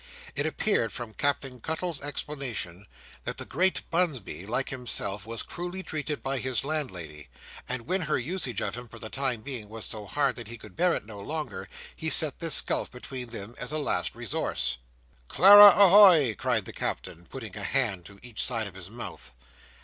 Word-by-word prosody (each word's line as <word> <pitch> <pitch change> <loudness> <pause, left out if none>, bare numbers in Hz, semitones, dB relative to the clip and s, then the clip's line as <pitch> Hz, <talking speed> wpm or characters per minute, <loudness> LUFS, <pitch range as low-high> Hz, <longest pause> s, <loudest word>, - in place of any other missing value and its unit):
It 145 +3 -1
appeared, 155 - 0
from 120 -3 -6
Captain 135 -2 -2
Cuttle's 160 +3 -3
explanation, 130 - -4 0.4
that - - -5
the - - -6
great 185 +2 +1
Bunsby, 130 - -2
like 130 +4 -1
himself, 110 -5 -2
was 115 0 -4
cruelly 180 +2 -6
treated 150 -2 -4
by 135 0 -1
his 130 0 0
landlady, 95 - -4 0.4
and 130 -1 -2
that - - -18
when 190 +1 0
her 155 -2 0
usage 130 - -2
of - - -3
him 120 +1 -8
for 115 - -13
the 110 -1 -8
time 130 -4 -1
being 120 -5 -6
was 110 0 -5
so 105 -2 -2
hard 135 +4 0
that 120 -3 -7
he 120 +1 -8
could - - -13
bear 175 +1 +2
it - - -5
no 105 -2 -10
longer, 145 -7 -5 0.3
he 160 - -2
set 155 -3 +6
this 165 -2 +5
gulf - - -1
between 125 0 -8
them 115 -1 -7
as 125 - -3
a 155 - -1
last 90 - -1
resource. - - -2 0.5
"Clara 205 - +10
a 200 - +9
hoy!" 175 - +7
cried 120 -6 -1
the - - -9
Captain, 85 +1 -4
putting 110 -8 -8
a 105 - -5
hand 100 -6 0
to 100 +2 -13
each 120 -3 -5
side 115 -3 0
of 100 - -8
his 95 -1 -10
mouth. 115 +2 -9
125 Hz, 195 wpm, -27 LUFS, 110-155 Hz, 0.5 s, Clara